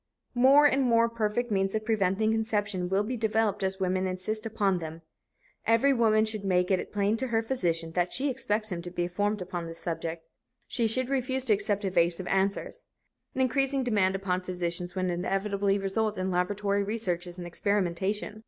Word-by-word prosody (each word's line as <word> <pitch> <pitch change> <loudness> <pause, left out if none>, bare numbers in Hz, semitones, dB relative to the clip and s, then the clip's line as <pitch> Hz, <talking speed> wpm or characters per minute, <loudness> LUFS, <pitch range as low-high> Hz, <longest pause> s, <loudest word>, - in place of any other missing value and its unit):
More 270 +4 +6
and 275 -1 +4
more 230 -2 +4
perfect 230 +1 -2
means 195 0 0
of 215 0 -2
preventing 215 0 +1
conception 210 -4 -1
will 195 +2 +2
be 245 +4 -3
developed 220 -3 0
as 190 0 -1
women 185 0 0
insist 215 +4 -3
upon 200 -4 0
them. 165 0 -8 0.6
Every 230 +5 +4
woman 220 -3 +3
should 215 -2 -3
make 180 -1 +1
it 185 - 0
plain 205 +2 +1
to 260 +3 -2
her 225 -2 0
physician 170 -9 -1
that 175 +1 0
she 275 +3 0
expects 215 -5 -1
him 170 -1 -3
to 175 - -7
be 175 0 -2
informed 205 +3 -1
upon 175 -2 -5
this 165 0 -8
subject. 165 -1 -5 0.4
She 235 -3 0
should 255 +3 0
refuse 265 -1 +1
to 225 - +4
accept 205 0 0
evasive 175 -1 +2
answers. 195 +1 -1 0.5
An 260 - 0
increasing 270 +1 +1
demand 205 -6 +2
upon 185 -1 -1
physicians 175 -1 -3
will 185 -1 0
inevitably 195 +3 0
result 210 +2 -1
in 185 0 -1
laboratory 200 +3 0
researches 185 -4 -3
and 175 - -6
experimentation. 200 +3 -1
200 Hz, 180 wpm, -28 LUFS, 180-225 Hz, 0.6 s, More